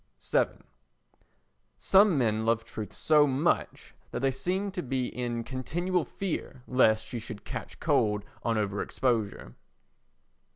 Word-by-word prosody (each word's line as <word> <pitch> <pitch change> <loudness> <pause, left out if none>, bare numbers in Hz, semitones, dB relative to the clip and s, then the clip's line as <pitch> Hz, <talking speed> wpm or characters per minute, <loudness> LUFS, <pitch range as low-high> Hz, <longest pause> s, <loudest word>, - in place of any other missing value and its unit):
vii - - +5 1.3
Some 195 -3 +5
men 110 -4 +1
love 115 0 +2
truth 105 -3 -6
so 150 -2 +4
much 140 +5 0 0.2
that - - -4
they 135 0 +2
seem 185 +9 -2
to 185 - -3
be 130 -2 -1
in 120 -2 -3
continual 170 +8 -1
fear 155 -9 -4
lest 110 -4 +3
she 120 - -5
should 110 -2 -8
catch - - -6
cold 105 -1 +1 0.2
on 115 -1 0
over 100 -2 -1
exposure. 110 - -1
125 Hz, 130 wpm, -29 LUFS, 110-155 Hz, 1.3 s, vii